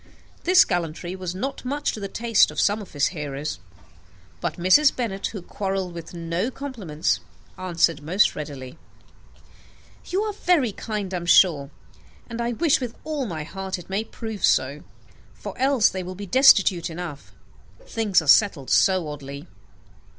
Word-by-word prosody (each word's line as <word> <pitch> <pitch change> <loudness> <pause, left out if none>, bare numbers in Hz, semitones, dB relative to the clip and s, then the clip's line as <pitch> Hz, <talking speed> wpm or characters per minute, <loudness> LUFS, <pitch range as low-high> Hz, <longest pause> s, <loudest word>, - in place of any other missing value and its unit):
This 365 +1 +7
gallantry 175 0 -3
was 185 -1 -5
not 270 +8 -4
much 285 +3 -1
to - - -7
the 200 - -4
taste 230 +1 +3
of - - -5
some 210 +1 +2
of 200 - -12
his 145 -1 +2
hearers; 145 - -5 0.8
but - - -3
Mrs. 185 - +5
Bennet, 200 -6 -2
who 200 -5 -8
quarrelled 190 -2 -3
with 170 -1 -8
no 170 +6 -2
compliments, 225 - -2 0.4
answered 170 -4 0
most 180 +7 +2
readily, 145 -1 -7 1.3
"You 385 +3 0
are 430 -1 -3
very 345 - +2
kind, 205 -2 -5
sir, - - -2
I - - -3
am 170 - -7
sure; 155 -7 +5 0.6
and 235 0 -5
I 235 +1 -1
wish 310 +1 +2
with 240 -3 -5
all 300 -5 -3
my 160 -5 -4
heart 190 +4 -5
it 180 +1 -12
may 200 +3 0
prove 220 -3 -7
so; 140 +3 +2 0.5
for - - -8
else 265 -4 +4
they 190 - -4
will 185 +1 -7
be 205 +2 -7
destitute 195 -7 +5
enough. 165 -4 -7 0.5
Things 210 - +1
are - - -10
settled 155 -5 +4
so 185 -4 +3
oddly." 140 -1 -8
190 Hz, 165 wpm, -24 LUFS, 165-230 Hz, 1.3 s, This